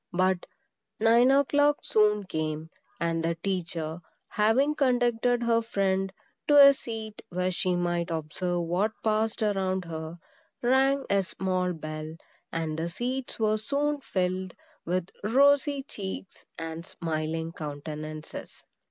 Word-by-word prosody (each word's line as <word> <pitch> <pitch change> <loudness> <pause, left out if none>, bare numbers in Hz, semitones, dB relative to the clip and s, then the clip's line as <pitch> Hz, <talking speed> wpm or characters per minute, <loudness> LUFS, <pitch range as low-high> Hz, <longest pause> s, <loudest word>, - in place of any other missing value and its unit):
But 185 0 +1 0.5
nine 230 +3 +5
o'clock 290 +2 +4
soon 210 -1 +3
came; 155 -2 -3 0.3
and 165 -1 0
the 165 0 0
teacher, 165 -3 -3 0.3
having 235 +8 +3
conducted 245 -3 +2
her 230 -1 +3
friend 195 -3 0 0.4
to 290 - +6
a - - +5
seat 225 -4 -7
where 180 +1 -1
she 180 0 0
might 175 -1 0
observe 170 +3 -2
what 180 +6 0
passed 220 +1 +1
around 190 -3 0
her, 160 0 -6 0.5
rang 270 +2 +3
a 200 0 +3
small 185 -1 -1
bell, 155 0 -6 0.4
and 160 -1 -2
the 165 +1 -1
seats 250 +7 -3
were 215 -1 +2
soon 285 +6 -1
filled 185 -3 -2 0.3
with 180 +1 -1
rosy 280 +4 +4
cheeks 195 -7 -7
and 165 0 -5
smiling 160 -1 -3
countenances. 155 0 -7
190 Hz, 125 wpm, -28 LUFS, 165-230 Hz, 0.5 s, to